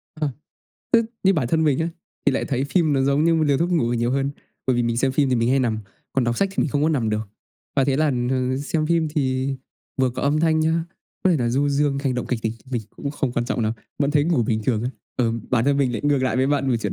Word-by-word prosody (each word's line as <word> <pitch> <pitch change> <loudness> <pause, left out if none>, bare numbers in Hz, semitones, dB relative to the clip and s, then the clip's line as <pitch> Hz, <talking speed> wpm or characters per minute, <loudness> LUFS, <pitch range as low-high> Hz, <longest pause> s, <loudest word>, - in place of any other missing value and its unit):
Ờ. 155 -2 -1 0.6
Ư, 230 0 +6 0.2
như 195 0 +4
bản 130 -7 0
thân 160 +2 +2
mình 145 -3 +2
á, 160 +1 0 0.4
thì 140 - +5
lại - - 0
thấy 135 0 -1
phim 155 0 +2
nó 135 - +2
giống 140 +3 +2
như 165 0 +4
một 160 - +2
liều 140 -2 +2
thuốc 175 +2 0
ngủ 120 -9 +1
nhiều 120 +1 0
hơn, 135 +1 0 0.4
bởi 130 -2 +2
vì 120 - +2
mình 115 0 0
xem 130 +1 +1
phim 140 0 +2
thì 130 - +2
mình 115 +1 +1
hay 135 - +3
nằm, 115 -4 0 0.3
còn 130 -2 +1
đọc 120 0 0
sách 195 - +2
thì - - -1
mình - - 0
không 145 +3 0
có 155 - +3
nằm 125 -8 0
được. 105 -1 -2 0.5
Và 135 - +4
thế 135 -1 +1
là, 155 +1 +3 0.2
ừm, 130 0 0
xem 155 +2 -1
phim 165 -2 +2
thì 135 -3 0 0.5
vừa 130 -1 +3
có - - -5
âm 145 +2 +2
thanh 160 -1 +3
nhá, 160 +1 +1 0.4
có 185 - +5
thể 165 - +3
là 120 -3 0
du 140 +4 +1
dương, 140 0 +1
hành 135 -3 -1
động 125 - -3
kịch 120 -3 -2
tính 110 0 0 0.2
mình 120 -3 -1
cũng 140 - -4
không 135 -4 -2
quan 120 - 0
trọng 120 0 -2
lắm, 110 0 +1 0.3
vẫn 140 0 +2
thấy 145 -1 +3
ngủ 165 -8 +2
bình 110 -1 0
thường 115 -4 +1
á. 125 - -1 0.3
Ờ, 115 -2 +1 0.2
bản 120 -1 +2
thân 140 0 +3
mình 130 -3 +2
lại 115 - -2
ngược 145 -2 +3
lại 130 0 +1
với 130 +1 +2
bạn 140 -2 +1
về 120 - +3
chuyện 115 - -2
135 Hz, 290 wpm, -23 LUFS, 125-150 Hz, 0.6 s, Ư